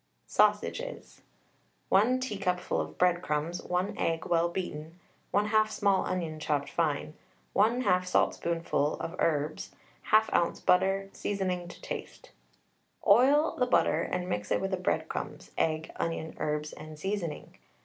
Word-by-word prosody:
SAUSAGES. - - 0 0.7
1 230 +7 +4
teacupful 195 -7 -1
of - - -7
breadcrumbs, 175 -2 +1
1 180 +2 -1
egg 165 -1 0
well 170 0 +2
beaten, 165 -2 -5 0.3
1/2 215 +1 +3
small 200 -3 +2
onion 165 -4 -3
chopped 145 -2 -1
fine, 155 -2 -1 0.4
1/2 210 -4 +3
saltspoonful 165 -4 +1
of 165 - -5
herbs, 155 -1 -1 0.3
1/2 220 0 +5
oz. 170 - +2
butter, 195 +2 +2
seasoning 185 -3 -2
to 175 - -11
taste. - - -7 0.7
Oil 270 +9 +5
the 250 - +3
butter - - +3
and 180 0 -2
mix 105 - -3
it - - +2
with 195 0 -2
the 190 - 0
breadcrumbs, 180 - -3
egg, 160 0 0
onion, 165 -1 -3
herbs, 150 0 -2
and 155 0 -10
seasoning. 180 -2 -4
180 Hz, 130 wpm, -29 LUFS, 160-200 Hz, 0.7 s, 1/2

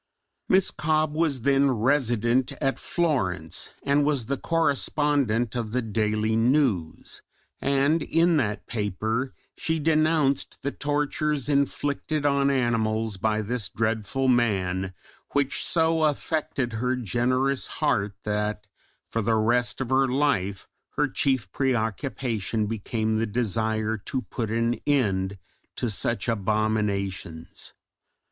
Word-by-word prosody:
Miss 190 0 +4
Cobbe 155 -1 0
was 155 -6 +1
then 140 +2 +3
resident 120 0 +2
at 135 -1 -1
Florence 95 - -1
and 140 +1 +3
was 140 -5 +1
the 140 - -1
correspondent 140 -7 +1
of 115 -3 -3
the 125 - +1
Daily 110 0 0
News, 115 - +1 0.4
and 140 +4 +2
in 165 +2 +3
that 105 -7 -1
paper 110 +4 -2 0.2
she 160 0 -1
denounced 155 -2 +1
the 140 - -1
tortures 145 -1 -1
inflicted 145 +1 0
on 140 -1 +3
animals 115 -5 0
by 110 +2 0
this 115 +1 -3
dreadful 110 +4 -1
man, 95 -6 +1 0.4
which 140 -1 +1
so 165 -2 +2
affected 145 -4 -1
her 125 +3 0
generous 130 +4 0
heart 100 -3 0
that 105 0 -2 0.4
for 115 - -2
the 110 +1 +1
rest 120 +3 +1
of 130 -1 -3
her 135 0 +4
life 125 -8 0 0.3
her - - +2
chief 130 -9 0
preoccupation 115 -3 -1
became 110 +1 -1
the 115 - 0
desire 110 0 0
to 130 +5 -4
put 115 -4 -4
an 115 +1 0
end 100 -9 +1 0.4
to 120 - -2
such 115 +3 0
abominations. 100 -5 -2
120 Hz, 120 wpm, -26 LUFS, 110-140 Hz, 0.4 s, Miss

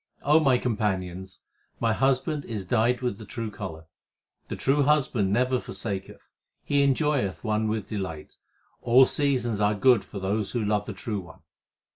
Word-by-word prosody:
my 145 -3 +5
companions, 95 -5 -3 0.4
my 115 -1 +1
Husband 135 +4 +1
is 105 -5 -5
dyed 120 +5 +1
with 120 -5 -2
the - - -8
true 115 0 -5
colour. 80 -6 -7 0.6
The - - -4
true 140 +2 +1
Husband 135 -9 +2
never 125 +4 +2
forsaketh; 100 -6 -6 0.4
He 145 0 +2
enjoyeth 140 - +1
one 110 -1 0
with 110 -1 -3
delight. 95 -8 -6 0.4
All 125 +2 +6
seasons 125 -7 0
are 105 0 +2
good 120 +1 +4
for - - -10
those 100 +2 -2
who 120 -4 -1
love 105 0 0
the 105 - -4
True 105 +1 -4
One. 85 -3 -13
110 Hz, 155 wpm, -26 LUFS, 100-130 Hz, 0.6 s, All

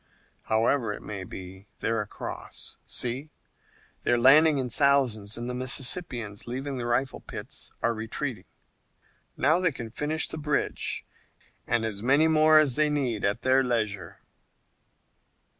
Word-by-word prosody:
"However 115 +1 +2
it - - -9
may 100 -3 -5
be, 95 +1 -10
they're 115 -1 0
across. 105 - -7
See, 130 +5 -3 0.7
they're 120 - +2
landing 145 +5 +6
in 130 -2 -1
thousands, 125 -7 +2
and 120 +1 -5
the 125 - -3
Mississippians, 125 - 0
leaving 130 +2 -4
their 120 - -3
rifle 130 +2 0
pits, - - -6
are 115 - +2
retreating. 110 -1 -4 0.9
Now 155 +7 +3
they 180 -3 +2
can 120 -5 -7
finish 150 +5 0
the 160 - -5
bridge 150 -2 -1 0.6
and 115 -1 +1
as 100 -2 -3
many 140 +7 +4
more 155 0 +5
as 145 -5 +4
they 155 0 +3
need 130 -8 -1
at 100 +3 0
their 130 +1 +4
leisure." 110 -7 -2
125 Hz, 140 wpm, -27 LUFS, 110-145 Hz, 0.9 s, landing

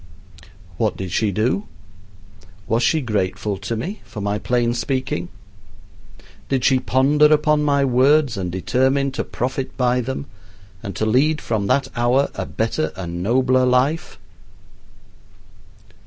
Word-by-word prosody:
What 110 -2 0
did 95 -2 -5
she 110 -2 +1
do? 115 - 0 1.0
Was 115 +2 +1
she 160 +5 +2
grateful 100 -3 -2
to 105 +4 -3
me 180 - -5
for 105 - -9
my 100 +1 -1
plain 120 0 0
speaking? 125 -8 -2 1.2
Did 130 -2 0
she 130 -1 +4
ponder 140 +4 +3
upon 150 0 +3
my 140 -2 +2
words 135 +1 +3
and 90 -3 -3
determine 130 +8 +1
to 135 - -3
profit 130 +1 -4
by 125 -1 +2
them 130 +3 -4 0.6
and 100 -3 -6
to 110 - -1
lead 140 +8 +2
from 105 -3 -2
that 140 +6 +1
hour 125 +3 +2
a - - -5
better 110 -8 -1
and 85 -2 -5
nobler 130 +5 +2
life? 135 - +1
125 Hz, 135 wpm, -21 LUFS, 105-140 Hz, 1.2 s, she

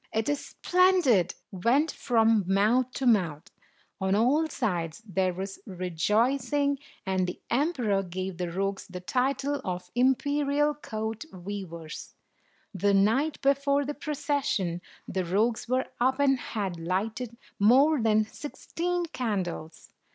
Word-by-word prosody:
"It 220 0 -1
is 290 -1 -1
splendid!" 355 - +3 0.2
went 245 - +2
from 225 -4 +2
mouth 215 +6 +3
to 270 - -3
mouth. 180 -8 +2 0.5
On 190 0 +1
all 270 +9 +3
sides 180 - -2
there 190 -2 0
was 195 +2 -6
rejoicing, 235 - +1 0.3
and 190 -1 0
the 180 - -5
emperor 245 - +1
gave 185 0 -5
the 175 -1 -2
rogues 195 +2 -2
the 180 -1 -7
title 270 +7 0
of 180 -1 -5
Imperial 285 +4 +2
Court 220 -5 -5
Weavers. 175 -4 -7 0.6
The 200 +1 +2
night 235 +10 +2
before 280 +1 +2
the 295 - -3
procession, 280 - -1 0.3
the 190 -1 -1
rogues 220 +7 0
were 255 +1 +1
up, 260 +2 +2
and 270 -2 +3
had 195 -9 -4
lighted 215 +7 -2 0.2
more 265 +7 +5
than 215 -1 +3
sixteen 345 +7 -3
candles. 195 - -4
225 Hz, 125 wpm, -28 LUFS, 190-275 Hz, 0.6 s, more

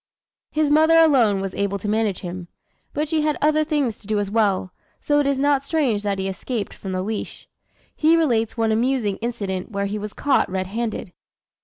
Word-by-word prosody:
His 305 -1 +1
mother 315 +2 +5
alone 250 -12 +4
was 195 -1 -4
able 200 0 -1
to 200 - -6
manage 210 -2 0
him, 180 -1 -6 0.4
but 300 +2 -2
she 310 +1 +1
had 300 -1 0
other 310 +1 +3
things 290 -8 -1
to 205 - -18
do 215 -1 0
as 205 -1 -2
well; 200 -4 +1 0.3
so 290 0 +1
it 285 - +1
is 280 -1 +1
not 285 -1 +3
strange 280 -8 0
that 200 -1 -1
he 190 0 -2
escaped 205 +3 -4
from 190 - -7
the 185 0 -2
leash. 215 +1 -5 0.5
He 320 +2 +4
relates 235 -9 +1
one 225 -1 +1
amusing 230 -3 +1
incident 200 -6 -4
where 200 -2 -2
he 205 +1 -3
was 210 0 -6
caught 285 -2 +1
red 185 0 -2
handed. 215 -2 -4
225 Hz, 200 wpm, -22 LUFS, 200-290 Hz, 0.5 s, mother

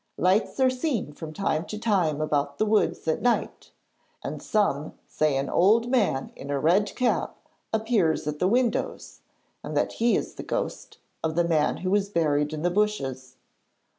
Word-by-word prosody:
Lights 190 +8 +1
are 260 -1 +4
seen 255 - -2
from 155 +1 -8
time 155 -2 -1
to 215 - -6
time 185 -9 +1
about 145 -2 -1
the 215 - +2
wood 215 0 +2
at 160 -1 0
night, 245 -1 0 0.5
and - - -5
some 155 -9 0
say 155 -3 0
an 135 +1 -1
old 225 +6 +3
man 205 - +1
in 140 - -9
a 145 - 0
red 185 +8 +2
cap 250 -1 0 0.3
appears 220 -9 +1
at 150 0 -3
the 180 - +2
windows 240 +3 -1 0.4
and - - -4
that - - +1
he 235 0 +4
is - - -2
the - - -7
ghost - - -4 0.3
of 160 -1 -1
the 170 0 +2
man 155 -3 +2
who 185 - 0
was 200 0 +2
buried 150 -5 +1
in 155 0 -5
the 175 - +2
bushes. 135 -11 -1
175 Hz, 175 wpm, -26 LUFS, 150-215 Hz, 0.5 s, are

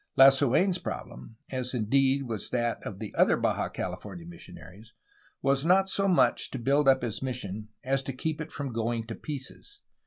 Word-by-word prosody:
Lasu^n's 135 +7 +5
problem, 65 - -7
as 130 -1 -3
indeed 135 +4 +2
was 115 -5 -4
that 120 -1 -1
of 100 - -6
the 110 0 -7
other - - +4
Baja - - 0
California 90 -5 -6
missionaries, 90 +5 -13 0.5
was 135 0 +2
not 190 +3 +4
so 195 +1 +1
much 180 -2 +3
to - - -5
build 140 +4 +2
up 130 -2 +5
his 115 -2 -3
mission 110 -5 -4
as 135 +1 +1
to 135 - -5
keep 155 +4 -3
it 160 - -7
from 140 -4 -4
going 115 0 -1
to 115 - -6
pieces. 150 - -7
130 Hz, 175 wpm, -28 LUFS, 110-140 Hz, 0.5 s, Lasu^n's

